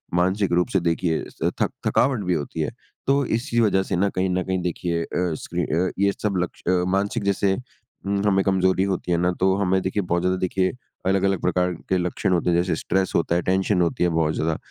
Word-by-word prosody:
मानसिक 95 +2 +1
रूप 90 0 +2
से 95 - +4
देखिए 85 -1 0
स - - -2
थक - - +2 0.2
थकावट 130 -5 +2
भी 90 - +1
होती 75 -4 -4
है। - - -1 0.4
तो 140 +1 +3
इसी 120 0 -1
वज़ह 100 -4 +3
से - - -2
ना 100 +3 +2
कहीं 95 0 -1
न 90 0 0
कहीं 95 -1 -1
देखिए 85 -1 -2
अ, - - -5 0.4
स्क्री 85 +1 -3
अ, 90 +4 0
ये 100 0 +3
सब 100 -3 0
लक्ष 90 - -8
अ, 90 -1 +3
मानसिक 100 +1 0
जैसे 100 0 +2 0.5
उम, 100 0 0
हमें 95 -1 +3
कमज़ोरी 95 -1 +2
होती 95 -2 -2
है 85 - +3
ना, 90 +1 +2
तो 95 +1 +1
हमें 95 -1 +1
देखिए 95 +2 -1
बहुत 85 0 0
ज़्यादा 90 +1 +1
देखिए 95 0 0 0.4
अलग-अलग 95 0 +2
प्रकार 90 0 +1 0.2
के 95 - +3
लक्षण 90 +2 -1
होते 90 0 +1
हैं 85 - +3
जैसे 85 -1 +1
स्ट्रेस 95 +3 0
होता 85 0 +1
है 90 - +2
टेंशन 95 +1 +1
होती 85 0 +1
है 90 - +3
बहुत 80 -2 +1
ज़्यादा। 80 0 0
95 Hz, 225 wpm, -23 LUFS, 90-95 Hz, 0.5 s, से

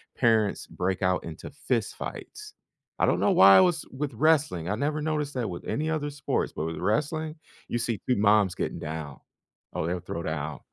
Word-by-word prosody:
parents 110 -4 +2
break 95 +1 -2
out 90 -1 +1
into 80 -1 -8 0.2
fist 115 -6 0
fights. - - -8 0.5
I - - +4
don't - - +2
know - - +3
why 95 0 +8
it - - +8
was 175 -4 +2
with 140 +1 -4
wrestling, 145 - +2
I 105 - 0
never 150 +5 -1
noticed 150 -2 -1
that 125 -4 -2
with 85 - -7
any 155 +2 -1
other 155 -2 -1
sports, 140 -2 -2
but 75 - -2
with 80 0 -4
wrestling, 150 - -1 0.3
you 120 - -2
see 115 -2 -1
pe 125 - +4
moms 100 -3 +4
getting - - -3
down. 75 -2 -6 0.5
Oh, 80 - -2
they'll 90 +1 -1
throw 85 -1 -5
down. 75 -2 -3
110 Hz, 195 wpm, -27 LUFS, 90-145 Hz, 0.5 s, why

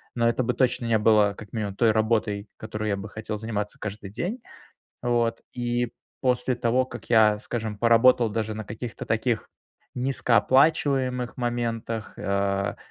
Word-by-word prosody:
Но 115 -1 +2
это 125 +2 0
бы 125 - 0
точно 125 -2 +1
не 115 -2 +2
было, 105 -2 +4
как 105 0 -12
минимум, 105 -3 -3
той 115 +1 +4
работой, 110 -2 0
которой 110 0 -4
я 100 - 0
бы 100 +2 -7
хотел 110 0 -5
заниматься 105 -2 -4
каждый 105 -2 -6
день. 205 - -4 0.6
Вот. 120 -1 0
И 120 0 -1 0.3
после 125 -1 +1
того, 125 +2 +1
как 130 - -10
я, 110 -2 +5
скажем, 110 -1 -4
поработал 115 0 +5
даже 110 0 -2
на 110 - -5
каких-то 110 +3 -6
таких 115 0 0 0.5
низкооплачиваемых 130 0 +2
моментах, 115 -2 -3
э, 100 0 0
115 Hz, 150 wpm, -25 LUFS, 105-120 Hz, 0.6 s, я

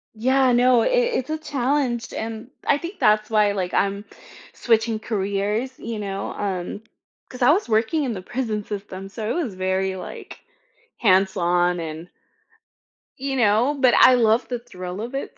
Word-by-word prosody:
Yeah, 260 +3 +3
no, 245 0 +4
i - - -1
i - - +2
it's - - +1
a 315 - -1
challenged, 265 -5 -1
and 225 +2 -5 0.2
I 285 - +4
think 345 +5 -8
that's 215 0 +3
why, 210 -1 +3
like, 185 -2 -3
I'm 200 +1 0 0.5
switching 225 -1 +1
careers, 210 +4 -2
you 230 -1 -5
know, 195 -1 -4
um, 195 +1 -4 0.5
'cause 250 0 -11
I 245 - +5
was 365 - +1
working 225 +8 +1
in 250 -4 -2
the 185 - -6
prison 220 0 -3
system, 195 -2 -7
so 215 +1 -5
it 345 - 0
was 210 -8 -6
very, 190 0 -1
like, 185 - -9 0.6
hands-on 180 -4 +2
and 165 +2 -6 1.1
you 270 0 -3
know, 235 +5 +2
but 255 -2 +5
I 255 - +7
love 230 0 +2
the 245 -2 -3
thrill 185 -4 -7
of 240 +3 -6
it, 275 - -5
220 Hz, 170 wpm, -23 LUFS, 195-255 Hz, 1.1 s, I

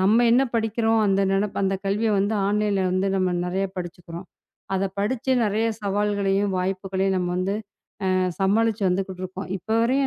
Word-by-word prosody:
நம்ம 220 +6 +4
என்ன 255 +3 +5
படிக்கிறோம் 225 0 +1
அந்த 195 0 +2
நெனப் 195 +1 0
அந்தக் 195 0 -1
கல்விய 210 +3 +1
வந்து 205 +3 +1
ஆன்லைன்ல 205 -2 +1
வந்து 190 +1 +1
நம்ம 185 -1 +1
நிறைய 190 +2 -1
படிச்சுக்கிறோம். 175 0 -7 0.5
அதைப் 195 0 -2
படிச்சு 255 +5 -1
நிறைய 215 +2 +1 0.2
சவால்களையும் 200 -1 0
வாய்ப்புகளையும் 190 +1 -1
நம்ம 180 -1 -1
வந்து 190 +2 0 0.6
அஹ் 185 0 +2
சமாளிச்சு 215 +2 +2
வந்துக்கிட்டு 185 0 -2
இருக்கோம். 185 +1 -6
இப்ப 200 - -33
வரைக்கும் 265 +4 +2
195 Hz, 155 wpm, -24 LUFS, 190-210 Hz, 0.6 s, என்ன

